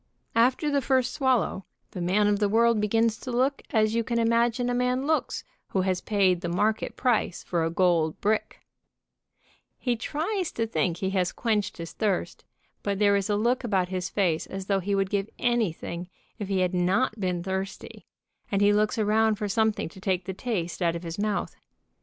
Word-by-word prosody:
After 255 +6 +3
the 285 -1 +2
first 260 -1 +1
swallow 255 -8 +1 0.3
the 180 - -6
man 190 +4 +2
of 205 -1 +2
the 205 -1 +2
world 230 0 +3
begins 225 +1 +1
to 255 - -6
look 260 +3 +1
as 215 -1 +2
you 230 0 +1
can 235 +2 -2
imagine 235 +1 +2
a 245 - 0
man 250 +2 0
looks 315 +1 0 0.2
who 190 - 0
has 185 -1 0
paid 190 -4 +2
the 175 - -3
market 210 +5 0
price 245 -8 0
for 170 -2 -1
a 165 - +1
gold 170 -2 +2
brick, 215 +1 -1 1.2
tfe 240 -3 +1
tries 340 - -2
to 230 - 0
think 185 -6 -1
he 190 +1 -2
has 185 -2 +1
quenched 215 -4 -1
his 165 -1 -7
thirst, 205 -4 -1 0.4
but 200 -1 -1
there 200 0 +4
is 200 +1 0
a 205 - +2
look 240 +5 +1
about 190 -6 0
his 185 -1 -3
face 175 -6 0
as 190 0 -6
though 195 0 +1
he 200 +2 -1
would 195 -1 0
give 200 0 -1
anything 180 -7 -1 0.3
if 205 - -4
he 190 -1 +1
had 180 0 +1
not 195 +6 +1
been 180 -3 -1
thirsty, 190 +1 -5 0.4
and 200 0 +2
he 205 0 +5
looks 210 +1 +1
around 220 0 +3
for 210 0 -3
something 220 +1 +1
to 185 +3 -13
take 185 -2 -1
the 190 - -4
taste 185 -5 -3
out 170 -1 +2
of 170 - -6
his 170 +2 -6
mouth. 210 -1 -1
205 Hz, 195 wpm, -27 LUFS, 185-230 Hz, 1.2 s, he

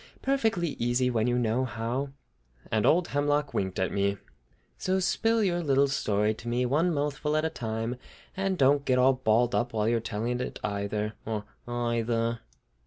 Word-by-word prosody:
Perfectly 225 -11 +1
easy 120 +2 +1
when 115 -1 +1
you 125 0 +2
know 120 +1 +1
how!" 125 +3 -2 0.6
And 110 -2 +2
old 175 +2 +3
Hemlock 145 0 0
winked 95 -1 -1
at 95 -1 0
me. 100 0 0 0.6
"So 190 +1 +1
spill 225 +5 +1
out 220 - +3
your 175 -2 +1
little 140 -3 +3
story 105 -5 +1
to 110 - -11
me, 120 +1 +1
one 155 +8 +2
mouthful 150 0 -1
at 155 - +1
a 160 - -1
time, 115 +1 -3 0.4
and 195 -1 -1
don't 140 0 +4
get 130 -2 +2
all 130 +1 +5
balled 120 -1 +2
up 120 0 0
while 110 -1 +1
you're 115 0 +2
telling 115 +3 -2
it - - -5
either, 105 +1 -2
or 105 -2 -3 0.2
eyether." 115 -1 0
125 Hz, 175 wpm, -28 LUFS, 110-145 Hz, 0.6 s, all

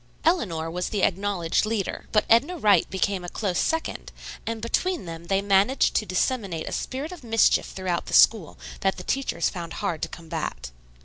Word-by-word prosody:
Eleanor 170 - +1
was 180 +1 -2
the 205 -3 -1
acknowledged 190 -3 +1
leader, 215 -3 -2
but 210 - +3
Edna 275 +11 +3
Wright 210 -8 +4
became 190 -1 -1
a 175 - -5
close 190 -3 -2
second, 325 0 -2 0.4
and 225 0 -2
between 335 - -1
them 165 0 -8
they 195 +2 +1
managed 200 +6 +3
to 215 - 0
disseminate 185 -3 -1
a - - -4
spirit 275 +5 -4
of 350 -6 -10
mischief 225 -2 +3
throughout 185 -2 -3
the - - 0
school 205 -9 +5 0.2
that 195 0 0
the - - -7
teachers 270 -11 0
found 170 -2 -6
hard 175 -6 -3
to - - -2
combat. 160 - -5
200 Hz, 180 wpm, -25 LUFS, 175-230 Hz, 0.4 s, school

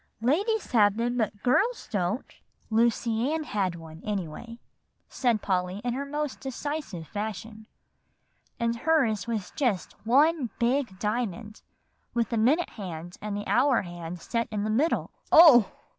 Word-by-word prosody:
"Ladies 400 - +1
have 210 -3 +4
them, 240 +1 -1
but 215 -3 -2
girls 410 - +1
don't." 200 +3 -1 0.5
"Lucy 230 +2 +1
Ann 320 0 -1
had 195 - -1
one, 160 -1 -11
anyway," 205 +3 -5 0.5
said 235 -5 0
Polly 185 0 -1
in 245 -1 -1
her 280 +2 -4
most 295 -1 -3
decisive 270 - -5
fashion; 215 +2 -6 0.9
"and 235 0 0
hers 245 - +1
was 220 -5 -3
just 240 -10 -1
one 280 +3 +3
big 240 -4 0
diamond, 215 0 -3 0.5
with 235 -1 +1
the 230 - -1
minute 275 +11 +3
hand 175 -4 -7
and 210 -1 -3
the 205 - -5
hour 255 -2 +3
hand 175 -1 -7
set 230 +6 -2
in 210 -2 -2
the 215 - -1
middle" 285 +10 +1 0.2
"Oh!" 285 - +8
230 Hz, 145 wpm, -27 LUFS, 205-260 Hz, 0.9 s, Oh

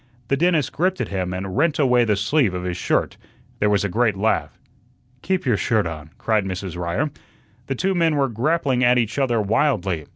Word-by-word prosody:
The 140 - +3
dentist 165 -1 +1
gripped 185 +3 0
at - - -2
him 95 -2 -2
and 95 +1 -5
rent 155 +2 +2
away 125 -4 +3
the 105 -2 +2
sleeve 105 0 +1
of 90 - -4
his 90 -1 -3
shirt. 90 - -1 0.4
There 105 - +2
was 105 -1 +2
a - - +1
great 110 +1 +1
laugh. 110 +3 0 0.6
"Keep 190 -1 -1
your 120 -5 +2
shirt 110 -2 +1
on," 80 -2 -6
cried 110 -2 +1
Mrs. 95 -2 -5
Ryer. 90 - -2 0.6
The 135 - -2
two 190 +9 0
men 165 -3 +2
were 140 -2 +2
grappling 130 +2 0
at 125 0 +4
each 120 +2 0
other 120 -4 +1
wildly. 100 - 0
115 Hz, 200 wpm, -22 LUFS, 95-140 Hz, 0.6 s, at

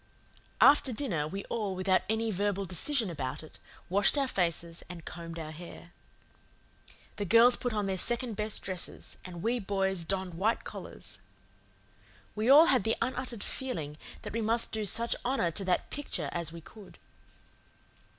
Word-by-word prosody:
After 285 -2 +6
dinner 195 - -1
we 195 +5 -5
all, 210 -5 -2
without 185 0 +2
any 220 0 +1
verbal 200 0 0
decision 215 - 0
about 140 -1 -4
it, 155 - -14 0.3
washed 200 +9 +3
our 275 -1 +2
faces 170 -5 -1
and 175 -2 -9
combed 170 -1 -7
our 155 -1 -5
hair. 170 +1 -10 1.3
The 205 - -2
girls 230 +6 +7
put 245 - -2
on 210 -2 -1
their 190 -1 -1
second 240 +3 0
best 210 +1 -3
dresses, 185 -2 -5
and 175 -2 -8
we 240 +2 +1
boys 190 -3 -1
donned 190 +1 -1
white 205 +7 +1
collars. - - -8 1.1
We 215 +3 0
all 295 +4 +10
had 260 - +3
the 225 - +2
unuttered 250 -2 -2
feeling 165 - -4 0.3
that - - -6
we 230 - -1
must 225 +2 +2
do 215 -1 -1
such 235 +5 +2
honour 245 -9 +1
to 195 - -2
that 180 -1 0
Picture 290 -1 -3
as 170 -2 -2
we 165 0 -9
could. 205 +4 -14
200 Hz, 160 wpm, -30 LUFS, 175-230 Hz, 1.3 s, all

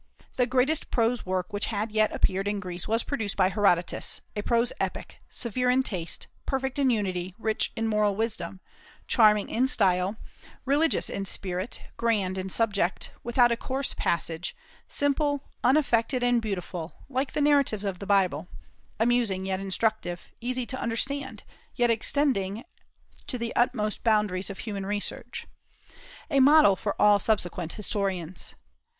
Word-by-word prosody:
The 250 -1 +2
greatest 260 +5 +1
prose 230 -2 +1
work 185 +2 -2
which 205 - 0
had 215 0 -2
yet 215 0 +2
appeared 195 +1 0
in 205 0 -1
Greece 180 -2 -5
was 225 +2 +1
produced 220 -8 -3
by 185 -1 +4
Herodotus, 180 -3 +1
a 210 - -1
prose 235 +2 +1
epic, - - -4
severe 250 +2 -1
in 260 +1 +4
taste, 175 -8 -4 0.2
perfect 265 0 -1
in 270 -2 +4
unity, 185 -5 -1
rich 220 -1 0
in 225 -1 -1
moral 210 -2 +2
wisdom, 200 -4 -3 0.4
charming 210 -3 +4
in 250 +3 +1
style, 190 -5 +2 0.5
religious 290 +4 +2
in 195 - -3
spirit, 185 +2 -3 0.2
grand 200 -5 0
in 190 +1 -4
subject, 200 -4 0
without 240 0 +4
a - - +3
coarse 265 +3 -2
passage; 170 0 -1 0.3
simple, 285 0 +1 0.2
unaffected, 250 -2 +2
and 245 -1 +3
beautiful, 180 -5 -4
like 270 0 -2
the - - -1
narratives 280 -8 +3
of 190 -3 -3
the 200 - -7
Bible, 195 -2 +2 0.5
amusing 225 -5 +2
yet 190 0 -1
instructive, 195 -2 -2
easy 250 +1 -2
to 260 +3 -3
understand, 265 +5 -2 0.3
yet 240 -2 +3
extending 225 -3 0 0.6
to 250 - -2
the 235 -1 -4
utmost 240 -4 0
boundaries 210 -4 +1
of 200 - -6
human 205 -3 -5
research, 205 +1 -4 0.9
a 280 - +4
model 280 -6 +7
for 205 +1 -3
all 205 -1 +6
subsequent 180 -5 0
historians. 190 -5 -2
215 Hz, 145 wpm, -27 LUFS, 190-245 Hz, 0.9 s, model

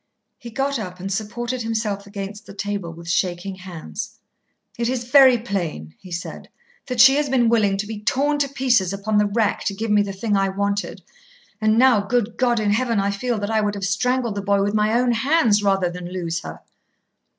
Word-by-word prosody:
He 240 - -9
got 275 +2 -1
up 180 -3 -7
and 195 +2 -3
supported 240 +4 -3
himself 215 -3 -2
against 200 +1 -7
the 195 - -11
table 200 -4 -3
with 170 0 -12
the 170 - -2
shaking 180 +2 -1
hands. 170 - -8 0.6
"It 235 0 0
is 250 -2 -2
very 260 0 +6
plain," 175 - -4
he 185 - -13
said, 170 0 -6 0.4
"that 250 -2 -4
she 265 +3 +8
has 295 -1 0
been 245 -3 +3
willing 210 -4 +2
to 200 - -2
be 210 0 -7
torn 285 +6 +1
to 280 -1 +1
pieces 245 -9 +1
upon 210 +2 0
the 210 - +3
rack 210 0 0
to 200 - -1
give 220 +2 -3
me 210 0 +5
the 200 -1 -2
thing 205 +2 -1
I 195 0 +2
wanted. 200 +1 -2 0.6
And 215 0 +3
now, 250 -3 +5
good 225 +1 -1
God 240 -2 +2
in 210 -1 +1
heaven, 230 0 +1
I 200 +1 +1
feel 235 +4 -2
that 205 +1 -3
I 220 -1 +2
would 205 0 -1
have 200 -1 -3
strangled 240 +4 0
the 200 - -3
boy 200 0 +1
with 205 +1 -1
my 215 +2 +2
own 250 -1 +2
hands 235 -3 +3
rather 195 -2 +2
than 180 0 -7
lose 170 -2 -3
her." - - -9
210 Hz, 215 wpm, -22 LUFS, 195-240 Hz, 0.6 s, she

